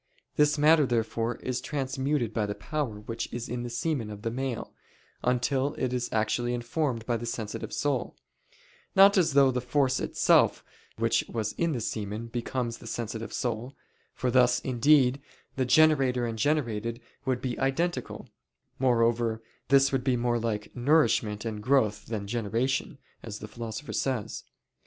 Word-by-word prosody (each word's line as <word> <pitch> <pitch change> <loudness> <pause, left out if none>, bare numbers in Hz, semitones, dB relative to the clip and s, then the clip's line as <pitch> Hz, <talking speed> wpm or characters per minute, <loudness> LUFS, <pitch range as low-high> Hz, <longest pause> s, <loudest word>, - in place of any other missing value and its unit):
This 150 0 +3
matter 150 -1 +5
therefore 115 0 -1
is 125 -1 -2
transmuted 135 -3 -1
by 110 -2 0
the 105 - -3
power 135 -9 -3
which 115 +2 -5
is 120 0 -4
in 120 +1 -3
the 120 - -4
semen 120 -1 -2
of 105 0 -9
the 115 - -1
male, 130 -1 -4 0.5
until 130 +3 0
it 125 -1 -2
is 125 -1 -1
actually 120 +3 0
informed 120 -1 -2
by 120 -1 0
the 120 - -6
sensitive 110 0 -4
soul; 140 -4 -1 0.8
not 195 +1 +8
as 170 -6 +3
though 135 -1 +6
the 125 0 -1
force 130 +1 +1
itself - - +3 0.3
which - - +2
was 110 -2 -2
in 170 -2 0
the 125 - -2
semen 105 0 -4
becomes 120 0 -3
the - - -11
sensitive 115 -1 -4
soul; 120 +2 -3 0.4
for 125 - -1
thus, 125 0 +4
indeed, 130 +1 +3 0.3
the 130 - 0
generator 130 -3 +4
and 115 -1 -4
generated 115 -5 0 0.3
would 130 -2 0
be 125 -2 -3
identical; 165 +6 -1 0.5
moreover, 115 -2 +2 0.2
this 135 +1 +5
would 135 -2 0
be 130 -2 +2
more 120 0 +1
like 110 -2 -3
nourishment 120 -6 +2
and 110 -2 -4
growth 110 -4 +1
than 110 -3 -3
generation, 115 +4 -1 0.2
as 105 - -7
the 105 - -8
Philosopher 115 +4 -6
says. 130 -6 -2
125 Hz, 155 wpm, -28 LUFS, 115-135 Hz, 0.8 s, not